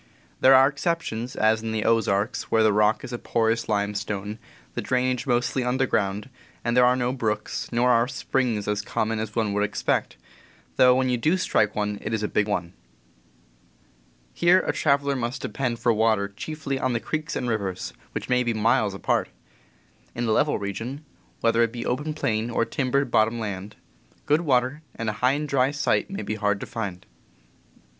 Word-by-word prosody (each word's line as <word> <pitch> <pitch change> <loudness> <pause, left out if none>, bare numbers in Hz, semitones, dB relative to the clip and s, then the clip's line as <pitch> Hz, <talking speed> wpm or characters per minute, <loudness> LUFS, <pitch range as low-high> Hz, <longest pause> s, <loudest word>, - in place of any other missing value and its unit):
There 135 0 +7
are 135 +1 +7
exceptions, 140 -5 -2
as 110 +1 +2
in 110 0 -3
the 110 -1 -1
Ozarks, 110 -1 +1
where 110 -1 +3
the 110 -1 +4
rock 105 +1 +2
is 120 - -7
a 120 - -3
porous 115 0 0
limestone, 105 0 -2 0.3
the - - -3
drainage 125 0 0
mostly 125 +1 +1
underground, 120 -5 0 0.4
and 120 0 +1
there 125 0 +6
are 125 - +4
no 125 0 0
brooks, 110 -4 -3
nor 125 +1 +3
are 115 0 +3
springs 125 -6 -1
as 105 0 0
common 110 +1 -2
as 110 -1 -5
one 110 -3 0
would 105 0 +1
expect, 105 - -1 0.6
though 125 -1 +6
when 130 0 +1
you 125 - +1
do 155 +10 +2
strike 105 - +1
one 105 -1 -2
it 110 - -2
is 110 - -3
a - - +1
big 105 0 0
one. 90 -4 -2 1.6
Here 180 +2 +4
a - - -1
traveler 140 -1 +1
must 120 0 -3
depend 125 -3 -2
for 115 0 +2
water 110 -2 +2
chiefly 140 +5 -5
on 130 -1 0
the 120 - 0
creeks 155 +5 -3
and 125 - -2
rivers, 100 -5 -3 0.2
which - - -4
may 125 0 +2
be 120 -2 -1
miles 110 -2 +2
apart. - - 0 0.9
In 120 - -2
a 110 - +1
level 150 +7 +2
region, 115 +9 -5 0.4
whether 115 0 +3
it 115 -1 +2
be 120 0 -5
open 150 +5 -2
plain 110 -5 -1
or 115 0 +1
timbered 135 0 0
bot 110 - +5
tom 115 +1 -4
land, 100 -2 -5 0.5
good 150 +3 +3
water 130 -1 +1
and 115 -1 -2
a 105 - -10
high 125 +1 +4
and 150 +1 -2
dry 135 -2 +2
site 150 +6 0
may 195 +1 -5
be - - -3
hard 105 -1 0
to - - -5
find. 100 -7 -5
115 Hz, 190 wpm, -25 LUFS, 105-130 Hz, 1.6 s, There